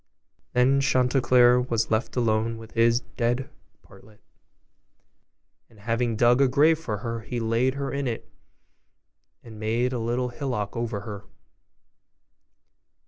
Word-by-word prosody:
Thus 135 +3 +3
Chanticleer 125 -2 +4
was 115 -3 -1
left 110 +3 -1
alone 115 -1 0
with 115 0 -12
his 115 +1 +3
dead 120 +2 -2 0.3
Partlet; 105 -1 -19 1.5
and 110 - -21
having 115 +2 -1
dug 120 +3 +4
a 135 - +5
grave 150 +5 +3
for 110 -10 -4
her, 115 0 -3
he 120 +2 -5
laid 115 +3 0
her 140 -1 -3
in 140 -1 -2
it, 115 -2 -4 1.2
and 110 -3 -12
made 115 +4 0
a 125 - -2
little 120 +2 -1
hillock 120 -6 -4
over 115 -3 -3
her. 100 -1 -8
120 Hz, 130 wpm, -25 LUFS, 115-125 Hz, 1.5 s, a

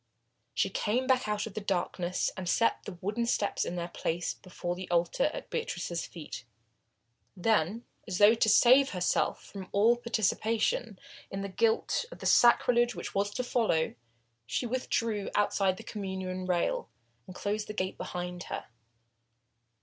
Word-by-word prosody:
She - - +1
came 240 +5 0
back 255 -3 +2
out 210 0 -1
of 220 - -8
the 215 - -4
darkness 180 -2 -1
and 180 -2 -4
set 230 - +2
the 185 - -7
wooden 215 +5 -1
steps 205 -4 +1
in 175 - -4
their 170 -1 -3
place 170 +1 -2
before 180 -1 -5
the 185 0 -7
altar 175 - +2
at - - -8
Beatrice's 175 - -3
feet. 150 -6 -8 0.9
Then, 215 +2 +1 0.2
as 185 -4 -2
though 205 +2 +7
to 225 -1 +2
save 255 +5 +6
herself 180 - 0
from 190 -2 -9
all 220 +4 +5
participation 225 -1 0 0.3
in 195 - -4
the 200 - -4
guilt 225 - +1
of - - -9
the - - -9
sacrilege 240 0 +5
which - - -6
was 200 +1 +1
to 250 - -1
follow, 225 -10 +1 0.5
she 245 - -1
withdrew 230 -4 -1
outside 195 -2 +2
the - - -9
Communion 190 -2 -4
rail, 175 -8 0 0.4
and 185 - -10
closed 210 +2 -2
the 210 - -5
gate 185 -2 -3
behind 180 0 -5
her. - - -6
205 Hz, 155 wpm, -30 LUFS, 180-230 Hz, 0.9 s, though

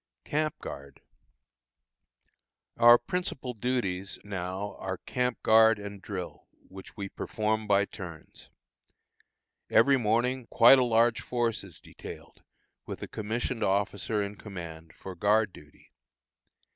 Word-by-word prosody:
CAMP 155 0 -1
GUARD. 70 0 -9 1.7
Our 120 0 +8
principal 130 -2 -4
duties 105 -6 -2
now 95 0 -4
are 95 -1 -4
camp 125 +3 -2
guard 110 0 +6
and 100 -1 -8
drill, 95 -4 -7 0.2
which 95 0 -12
we 100 -1 -4
perform 110 +2 -2
by 100 -1 +4
turns. 85 -6 -11 1.2
Every 135 +5 +5
morning 120 +2 0
quite 120 +3 +7
a - - +4
large 115 -1 +3
force 120 -3 -1
is 90 -6 -11
detailed, - - -12 0.5
with - - -6
a - - -5
commissioned 115 +2 -3
officer 100 +1 0
in 100 0 -6
command, 85 -6 -9
for 95 - -8
guard 105 +2 +2
duty. 75 0 -17
105 Hz, 120 wpm, -29 LUFS, 95-120 Hz, 1.7 s, Our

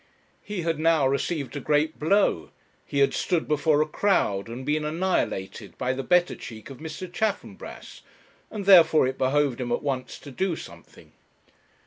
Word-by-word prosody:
He 205 -4 -5
had 165 -2 -1
now 160 -3 +3
received 140 +1 -2
a - - -2
great 150 +3 0
blow; 160 - +2 0.4
he - - -4
had 140 0 +3
stood 170 -3 -1
before 150 0 +2
a - - -8
crowd, 135 - +1
and 120 +3 -7
been 150 +1 0
annihilated 155 - -2
by 130 0 -1
the 135 - -3
better 180 +4 +2
cheek 110 +3 -10
of 135 - -11
Mr. 160 +4 -7
Chaffanbrass, 210 +4 -5 0.5
and, 205 -3 -6
therefore, 165 -7 +7
it 130 +1 -3
behoved 135 -1 +1
him 120 -1 -3
at 120 - -1
once 135 -3 -3
to 145 - -11
do 180 +6 -1
something. - - -13
150 Hz, 165 wpm, -25 LUFS, 130-170 Hz, 0.5 s, therefore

